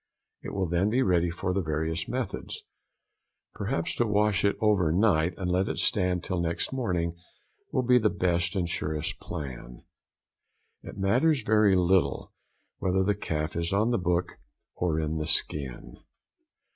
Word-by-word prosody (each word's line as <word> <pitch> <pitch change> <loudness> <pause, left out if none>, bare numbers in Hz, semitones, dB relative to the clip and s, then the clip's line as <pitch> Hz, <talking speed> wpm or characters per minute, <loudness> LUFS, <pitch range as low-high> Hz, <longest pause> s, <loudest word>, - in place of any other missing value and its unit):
It - - -7
will 95 -1 0
then 90 +4 +1
be 125 +4 +2
ready 90 -3 +2
for 90 +2 -2
the 100 - 0
various 80 0 -2
methods. 125 -5 -4 0.9
Perhaps 80 - -2
to 120 - +2
wash 105 0 +2
it 100 - +2
over 100 -7 +3
night 90 -3 +2
and 90 -2 -2
let 95 +2 +1
it - - -3
stand 90 -3 +1
till 90 - -2
next 85 +8 -2
morning 90 -10 -1 0.6
will 130 - +1
|103| - - -6
be 125 0 +6
the 110 -2 +3
best 85 -1 0
and 90 -3 0
surest 75 -2 -3
plan. 65 -6 -7 1.0
It - - -10
matters 125 +8 +2
very 105 -2 +4
little 90 -6 +1 0.5
whether 95 0 +1
the 105 +2 +2
calf 80 -5 -3
is 85 0 -1
on 105 +4 +2
the 120 - +1
book 90 0 -1 0.3
or 85 -3 -1
in 80 0 -2
the 75 -1 -3
skin. 70 -5 -1
90 Hz, 160 wpm, -27 LUFS, 80-105 Hz, 1.0 s, be